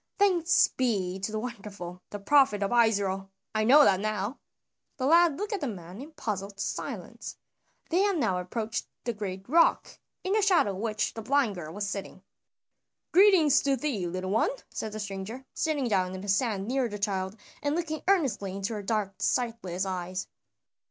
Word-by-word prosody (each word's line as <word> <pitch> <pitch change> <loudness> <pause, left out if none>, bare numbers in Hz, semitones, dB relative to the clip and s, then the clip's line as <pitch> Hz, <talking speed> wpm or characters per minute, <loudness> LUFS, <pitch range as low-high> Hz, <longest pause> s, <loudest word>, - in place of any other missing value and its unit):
Thanks 370 -3 +4
be 195 -7 -1
to 200 +3 -3
the 215 - -2
Wonderful, 200 -6 -7
the 205 - -5
Prophet 210 -1 +3
of 200 - -1
Israel, 200 -5 +2 0.2
I 215 0 +1
know 280 +7 +8
that 190 -8 +4
now!" 215 +4 -2 0.6
The 260 - -1
lad 330 0 +5
looked 415 +1 -3
at 400 - -2
the 285 - -1
man 185 -1 -7
in 290 - -9
puzzled 200 -5 -4
silence. - - -5 0.5
They 345 - +3
had 400 -2 +2
now 185 - +1
approached 220 +5 -3 0.2
the 235 - -2
great 195 -2 -6
rock, 335 +6 +3 0.2
in 380 - 0
the 430 - +3
shadow 370 - +4
of 190 - -6
which 215 +1 -1
the 225 - -6
blind 265 -2 +2
girl 165 -4 -7
was 205 +3 -3
sitting. 195 -1 -6 0.9
"Greetings 360 -7 +6
to 275 -1 +2
thee, 240 -9 -2
little 185 +2 -3
one!" 220 - +3 0.2
said 220 - -4
the 215 - -5
stranger, 205 +5 -6
sitting 295 -5 0
down 185 -4 0
in 185 - -6
the 205 - -8
sand 200 -1 +1
near 255 -1 0
the 210 - -5
child 195 0 -2 0.2
and 290 +1 0
looking 315 -3 -2
earnestly 270 - +1
into 200 +3 -3
her 210 - -4
dark 205 -1 -1
sightless 225 -7 -1
eyes. 185 0 -4
215 Hz, 180 wpm, -28 LUFS, 195-280 Hz, 0.9 s, know